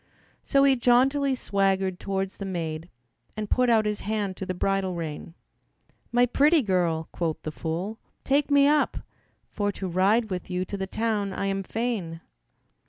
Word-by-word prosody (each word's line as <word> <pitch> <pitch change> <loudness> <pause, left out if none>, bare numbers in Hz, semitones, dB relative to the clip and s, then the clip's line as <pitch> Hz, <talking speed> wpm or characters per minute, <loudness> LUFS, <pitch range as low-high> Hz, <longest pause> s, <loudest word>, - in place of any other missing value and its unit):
So 275 -1 +3
he 275 -1 +5
jauntily 265 +3 +3
swaggered 195 -4 0
towards 195 -1 -3
the - - -4
maid 165 -3 -4 0.5
And 210 -1 -4
put 250 -1 +3
out 220 -2 +4
his 210 -1 -1
hand 205 -2 -2
to 190 - -5
the 185 - -2
bridle 195 0 0
rein. 165 0 -6 0.8
"My 245 +1 +4
pretty 290 +5 +3
girl," 175 -5 0
quoth 165 -3 -2
the 155 - -4
fool, 175 +8 -4 0.2
"take 280 +2 +2
me 285 -1 +5
up, 300 0 +2 0.5
For 205 -1 -1
to 190 - -5
ride 200 +5 +2
with 180 0 -4
you 180 0 -1
to 200 - -5
the 190 -1 -3
town 210 -2 -1
I 195 - -2
am 195 0 -1
fain." 200 -6 -3
195 Hz, 170 wpm, -26 LUFS, 180-240 Hz, 0.8 s, he